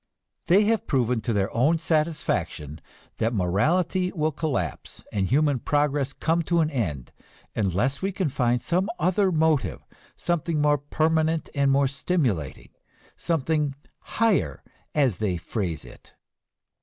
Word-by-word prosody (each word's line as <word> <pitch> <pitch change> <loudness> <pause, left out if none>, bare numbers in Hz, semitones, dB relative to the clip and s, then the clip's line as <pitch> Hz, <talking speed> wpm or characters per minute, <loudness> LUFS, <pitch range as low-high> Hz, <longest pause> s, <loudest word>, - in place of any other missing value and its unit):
They 195 +5 +5
have 220 +1 +1
proven 125 -4 +1
to 120 - -2
their 100 -1 0
own 145 +8 +3
satisfaction 155 - -1 0.4
that 115 +2 0
morality 170 - +1
will 155 -3 0
collapse 130 - -3
and 95 -2 0
human 145 +1 +2
progress 145 0 0
come 165 +3 0
to 170 -1 +3
an 155 0 0
end 80 - -3 0.4
unless 105 +7 0
we 195 +1 0
can 185 -4 -1
find 120 -2 0
some 185 +4 0
other 185 +3 +2
motive, 160 -3 +1 0.3
something 170 -2 -1
more 145 -1 +3
permanent 160 +2 0
and 140 -1 +2
more 135 0 +3
stimulating, 130 - -2 0.5
something 150 -3 0 0.4
"higher," 225 -3 +1 0.3
as 135 -9 +2
they 100 -5 -1
phrase 85 - -3
it. - - -16
145 Hz, 130 wpm, -25 LUFS, 115-165 Hz, 0.5 s, They